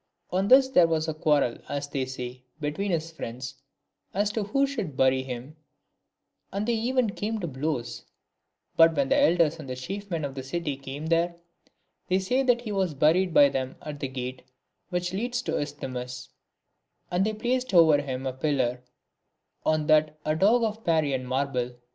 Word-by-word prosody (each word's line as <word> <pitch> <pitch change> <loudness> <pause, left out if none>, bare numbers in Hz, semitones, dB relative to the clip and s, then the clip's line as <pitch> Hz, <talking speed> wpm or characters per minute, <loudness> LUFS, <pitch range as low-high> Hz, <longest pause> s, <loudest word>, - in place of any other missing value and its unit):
On 190 +2 +1
this 260 +3 +7
there 180 -10 +5
was 160 -1 0
a 160 - -1
quarrel, 150 -5 +1
as 145 0 -3
they 135 -2 -2
say, 125 -1 -6 0.2
between 155 +7 -2
his 165 -2 -1
friends, 125 -5 -7 0.5
as 205 +1 +1
to 215 -1 -2
who 275 +7 +2
should 215 - -4
bury 130 0 +4
him, 130 +3 -7 1.0
and 200 +3 -2
they 240 - +2
even 235 0 +1
came 215 +2 -3
to 185 - -3
blows; 130 -5 -3 0.7
but 165 0 +6
when 140 -2 +1
the - - +4
elders 165 -1 +3
and 130 -4 -6
chief 195 +10 -6
men 165 -4 -2
of 140 - -5
the 135 - -5
city 145 +2 -3
came 135 +2 -7
there, 170 +1 +1 0.7
they 185 - +2
say 220 +8 +1
that 245 -2 +3
he 225 -3 -5
was 190 -6 0
buried 170 +6 +3
by 145 -3 +7
them 130 -1 -3
at 150 -1 -6
the 140 - -2
gate 130 0 -5 0.5
which 180 -1 -2
leads 245 +5 -2
to - - -3
the - - 0
Isthmus, 130 -4 -5 0.8
And 180 +2 +2
they 215 +2 0
placed 250 +4 -1
over 160 -5 +6
him 130 -2 -4
a 130 - -2
pillar, 130 -3 0 0.8
and 155 0 +2
on - - -4
that 155 0 +3
a 155 0 +1
dog 215 +8 +4
in 220 0 -2
Parian 145 -6 +1
marble. 130 -2 -1
155 Hz, 185 wpm, -27 LUFS, 135-195 Hz, 1.0 s, this